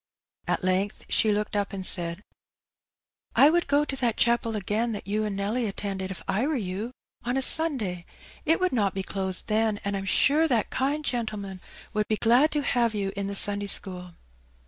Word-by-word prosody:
At - - 0
length 185 +2 -1
she 215 - +3
looked 210 0 -1
up 200 -1 -1
and 190 -1 -3
said, 170 -2 0
^^ - - -18 1.1
I 290 +3 +7
would 345 +1 +1
go 290 +1 +2
to 275 - -4
that 240 -4 0
chapel 235 -1 +2
again, 215 +3 -1
that 205 - -6
you 215 +2 -1
and 205 -2 -3
Nelly 220 +4 -1
attended, 195 -1 -4
if 190 - -6
I 220 +8 0
were 310 - 0
you, 205 +1 -4 0.3
on 245 +2 -1
a - - +1
Sunday. 230 - +3 0.4
It 325 +2 +2
would 370 -4 +1
not 205 -6 +1
be 195 - -2
closed 190 -1 -4
then, 215 -1 +1
and 200 0 -1
I'm 195 0 -4
sure 295 +10 +3
that 240 -7 0
kind 285 +3 -1
gentleman 210 -7 -4 0.3
would 210 -1 0
be 215 - 0
glad 245 +8 +4
to 295 -1 0
have 235 -4 +1
you 195 -1 -2
in 200 0 -3
the 200 - -4
Sunday 205 0 +3
school." 180 -2 -1
210 Hz, 200 wpm, -26 LUFS, 195-245 Hz, 1.1 s, I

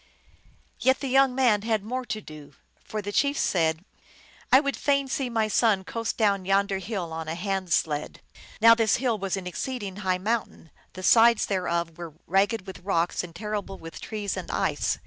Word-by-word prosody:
Yet 260 +1 +3
the 275 - -3
young 270 0 +4
man 240 -6 +3
had 220 -2 0
more 250 +4 -4
to 215 -2 -4
do; 155 -5 -12 0.3
for 215 -1 -5
the 205 - -4
chief 280 +6 +1
said, 165 -1 +1 0.3
" - - -26
I 260 - +8
would 280 -1 -1
fain 280 -1 +1
see 265 -1 -2
my 225 -2 +1
son 215 -3 +2
coast 230 +3 -4
down 200 -4 +2
yonder 195 +1 +1
hill 185 -4 -4
on 160 0 -5
a 160 - -3
hand 190 0 -3
sled." 150 -2 0 0.4
Now 230 +1 +8
this 225 -3 +2
hill 235 -4 0
was 195 0 -2
an 190 - -6
exceed 245 +6 -4
ing 190 -1 -6
high 185 -3 0
mountain; 205 -5 -3 0.2
the 185 - -9
sides 230 +3 +5
thereof 170 -3 -2
were 165 -3 -8
ragged 195 +2 +1
with 190 -2 -9
rocks 175 -2 0
and 170 -2 -10
terrible 205 0 -4
with 165 0 -10
trees 210 -2 -4
and - - -6
ice. - - 0
205 Hz, 195 wpm, -26 LUFS, 180-230 Hz, 0.4 s, I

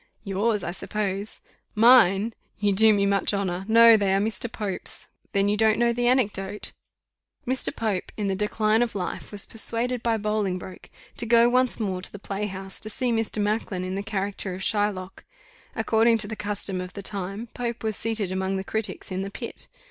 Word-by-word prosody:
"Yours, 205 +1 0
I 170 - -2
suppose." 200 +2 -3 0.4
"Mine! 225 -2 +6 0.2
you 205 -1 +1
do 220 +3 +6
me 200 -1 +2
much 200 +1 +1
honour: 190 -1 -2
no, 230 +1 +8
they 200 -2 +2
are - - +3
Mr. 220 +2 -2
Pope's. 210 -5 -5 0.3
Then 200 0 +2
you 205 - +2
don't 220 0 +3
know 235 0 +3
the 240 +1 0
anecdote? 210 -5 0 0.7
"Mr. 260 +1 -1
Pope, 210 -5 -2
in 210 - -2
the 195 - +1
decline 215 +2 +1
of 240 -3 0
life, 185 -3 -4
was 205 -1 -4
persuaded 235 +2 -2
by 230 -1 +1
Bolingbroke 205 -4 -3 0.3
to 235 - 0
go 235 0 +6
once 255 0 +2
more 190 -4 -2
to - - -2
the - - -8
play 200 +1 -4
house, 190 -1 -8
to 215 - -4
see 250 +3 -1
Mr. 225 -1 -1
Macklin 205 -3 -1
in 185 0 -3
the 195 - -2
character 200 -2 -3
of 190 - -6
Shylock. 205 -3 -1 0.5
According 225 +1 +3
to 215 -1 +3
the 220 - -5
custom 200 -2 -2
of 180 +1 -7
the 200 - -7
time, 200 +4 -3
Pope 235 -1 -4
was 220 -1 -1
seated 220 -4 -1
among 190 +1 -1
the 190 - -3
critics 210 -2 -3
in 185 0 -2
the 195 - -4
pit. - - -7
210 Hz, 195 wpm, -25 LUFS, 195-225 Hz, 0.7 s, no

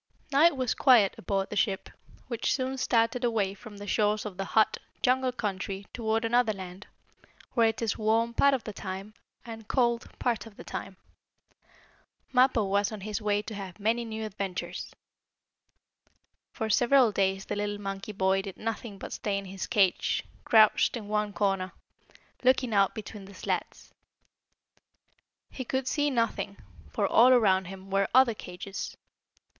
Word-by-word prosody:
Now 285 +3 +5
it 340 -5 +4
was 255 -3 0
quiet 235 -8 +5
aboard 195 +1 -2
the - - -3
ship, 200 -2 0 0.4
which 235 -2 -1
soon 265 0 -2
started 235 0 +1
away 215 -5 +1
from 205 +1 -12
the 205 - -8
shores 210 +1 +1
of 205 -3 -6
the 195 - -2
hot, 220 - +4 0.2
jungle 255 0 +2
country 200 -4 -4
toward 225 -1 0
another 235 -1 +3
land, 190 0 -9 0.7
where 230 -3 +4
it 225 +1 -2
is 225 - -1
warm 225 +2 +2
part 280 +3 +4
of 255 - -5
the 215 - -6
time 195 +2 -6 0.3
and 225 -2 -9
cold 235 -2 +1
part 230 -3 -1
of 210 - -16
the - - -9
time. 195 -1 -7 1.4
Mappo 255 -3 +4
was 200 +1 +1
on 215 -2 -7
his 210 +2 -4
way 205 0 +1
to 220 - -7
have 195 -2 -7
many 225 +3 +1
new 220 -1 -5
adventures. 195 -3 -5 1.6
For 220 - -3
several 245 +2 +4
days 195 -1 0
the - - -3
little 205 0 -2
monkey 195 +1 -5
boy 190 -1 +1
did 195 -1 -8
nothing 225 -2 -5
but - - -7
stay 200 -2 -2
in 200 - -5
his 190 0 -6
cage, 195 -3 +2 0.2
crouched 220 +2 +5
in 210 -3 -8
one 210 -1 0
corner, 195 -2 -1 0.7
looking 255 -2 +3
out 195 0 +3
between 210 -2 -8
the 200 0 -13
slats. - - -4 1.6
He 260 - -5
could 260 +1 -2
see 290 +1 +1
nothing, 230 -5 -1 0.3
for, - - 0
all 245 +3 +6
around 195 -6 +4
him, 190 +1 -10
were 195 0 +2
other 260 -3 +6
cages. 195 0 -7
215 Hz, 160 wpm, -28 LUFS, 195-235 Hz, 1.6 s, all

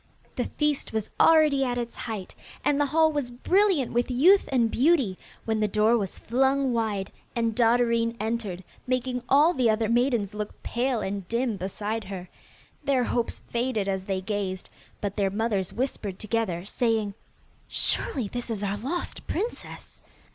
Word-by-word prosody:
The - - -1
feast 300 -5 -1
was 220 -2 -2
already 305 -4 +5
at 245 -2 -1
its 235 -1 -4
height, 215 -5 -5 0.3
and 290 0 +3
the 290 - +2
hall 315 +2 +4
was 290 -5 -2
brilliant 350 - +2
with 240 +2 +1
youth 335 +11 +5
and 235 -4 +2
beauty, 265 - +3 0.3
when 220 -1 0
the 215 - +2
door 215 +3 +3
was 200 -5 -2
flung 265 +2 +1
wide 210 -4 -1 0.2
and 230 -1 +1
Dotterine 235 0 +2
entered, 215 -4 -3 0.2
making 250 0 -1
all 300 +5 +6
the 250 -6 +2
other 220 0 +2
maidens 235 -4 +1
look 210 0 -6
pale 245 -1 0
and 195 -2 -4
dim 235 0 0
beside 205 +3 -3
her. 185 -2 -6 0.6
Their 265 -3 +2
hopes 240 -1 -2
faded 235 -4 0
as 190 -1 -2
they 190 -1 -1
gazed, 190 -2 -3 0.3
but 200 -1 -2
their 200 -2 +2
mothers 200 -2 -1
whispered 225 -6 -3
together, 210 -5 -2
saying, 220 -2 0 0.5
'Surely 250 -7 -1
this 245 +4 -5
is 210 -3 -3
our 200 0 -1
lost 280 +12 -4
princess! 440 +7 -5
230 Hz, 160 wpm, -26 LUFS, 205-260 Hz, 0.6 s, all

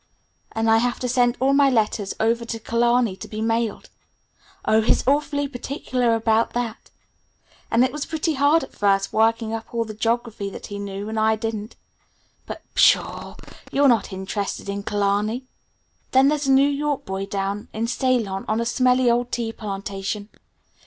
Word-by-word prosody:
And 225 0 0
I 225 0 +5
have 245 +1 0
to 250 - -1
send 245 0 +2
all 270 +2 +3
my 280 0 +5
letters 215 -4 0
over 230 +1 +1
to 230 0 -4
Killarney 235 -1 +1
to - - -8
be 215 - -6
mailed 225 0 -1 0.7
Oh, 220 +1 +4
he's 220 - +1
awfully 285 0 +1
particular 250 -3 -1
about 225 0 +1
that. 240 -2 -4 0.8
And 235 +2 +4
it 255 - -2
was 295 +1 -4
pretty 320 0 -1
hard 290 +3 +3
at - - -10
first 195 -1 +1
working 225 0 +2
up 225 +1 -6
all 230 0 0
the 215 - -7
geography 225 -2 -2
that - - -9
he 205 0 -6
knew 200 0 -5
and 220 0 -2
I 220 0 +3
didn't. 220 0 -5 0.7
But - - -7
pshaw! - - +3 0.4
You're 280 +1 +4
not 235 -6 +2
interested 195 +1 -4
in 200 0 -3
Killarney. 205 +4 0 0.7
Then 265 +1 +6
there's 295 -1 0
a - - +4
New 270 +1 +5
York 285 0 -1
boy 190 +1 -4
down 200 +1 -3
in 225 +1 -2
Ceylon 235 -6 0
on 215 +1 0
a 235 - -1
smelly 250 +1 +2
old 240 +1 0
tea 230 -2 -2
plantation. 200 0 -5
230 Hz, 175 wpm, -23 LUFS, 210-255 Hz, 0.8 s, Then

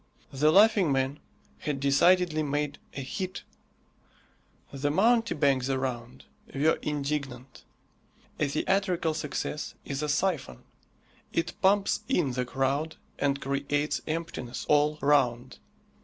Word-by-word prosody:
The 150 +3 +3
Laughing 200 -3 +5
Man 135 +2 0 0.4
had 145 -2 -3
decidedly 160 +4 +3
made 145 0 -2 0.2
a 135 - -4
hit. 185 +7 -5 1.3
The 140 +1 -1
mountebanks 155 - +2
around 130 -3 -3 0.3
were 150 +4 +2
indignant. 140 -3 -4 0.8
A 150 - +2
theatrical 175 +2 0
success 150 -1 -4
is 140 0 -3
a 150 - -2
syphon 150 - -1 0.7
it 165 0 -1
pumps 200 +1 +3
in 150 -7 +1
the 125 0 -2
crowd 135 +5 -1 0.2
and 140 -1 +1
creates 140 +2 -1
emptiness 155 -6 -4
all 150 +1 +3
round. 130 -4 +1
145 Hz, 110 wpm, -28 LUFS, 135-165 Hz, 1.3 s, Laughing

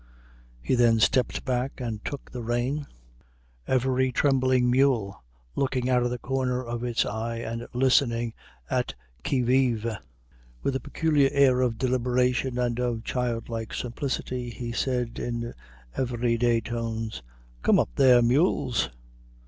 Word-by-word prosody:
He - - 0
then 120 -2 +4
stepped 125 +3 +2
back 130 +1 -1
and 115 -4 -4
took 140 - -6
the 125 - -5
rein, 120 +5 -1 0.8
every 130 0 +2
trembling 130 -1 +3
mule 120 - +2 0.3
looking 130 -2 0
out 125 -1 +4
of 120 - +1
the 125 - -3
corner 130 0 -1
of 120 0 -4
its 120 -1 +1
eye 115 +2 -3
and 115 0 -5
listening 120 -2 +2 0.3
at - - -1 0.3
qui 130 - +1
vive. 125 -3 +2 0.8
With 135 - 0
a - - 0
peculiar 145 0 +2
air 130 -2 +4
of 120 -3 0
deliberation 125 0 +1
and 120 -1 0
of 120 -2 -1
childlike 115 -3 -3
simplicity, 125 0 -3
he 120 0 -5
said 125 -1 -1
in 120 0 -3 0.4
every 120 -2 0
day 115 -1 +2
tones, 115 - -4 0.4
"Come - - +4
up - - +2
there, 125 -2 +6
mules!" 125 - +2
125 Hz, 135 wpm, -26 LUFS, 115-130 Hz, 0.8 s, there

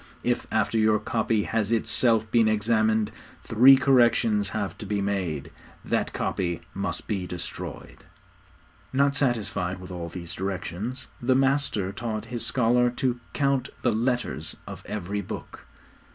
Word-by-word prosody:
If, 120 0 0
after 110 +1 +1
your 110 0 +4
copy 110 0 0
has 110 -1 -1
itself 115 -1 +2
been 115 -2 +4
examined, 110 0 +2 0.3
three 125 +5 +7
corrections 120 -6 +3
have 100 -5 -3
to - - -6
be 105 0 0
made, 95 -7 -2 0.3
that - - 0
copy 85 -2 -2
must 100 +1 -3
be 95 -4 -2
destroyed.' 90 -1 -7 0.9
Not 140 +1 +2
satisfied 105 -9 0
with 90 0 -10
all 85 -2 -5
these 85 -1 -6
directions, 95 +5 -4 0.2
the 130 +1 +3
master 135 -8 +1
taught 110 0 -4
his 120 - -2
scholar 120 +1 +3
to 125 0 -1
count 140 -2 +1
the 120 - +3
letters 115 - -1
of - - -9
every 100 0 -3
Book. 95 - -8
110 Hz, 135 wpm, -26 LUFS, 100-120 Hz, 0.9 s, three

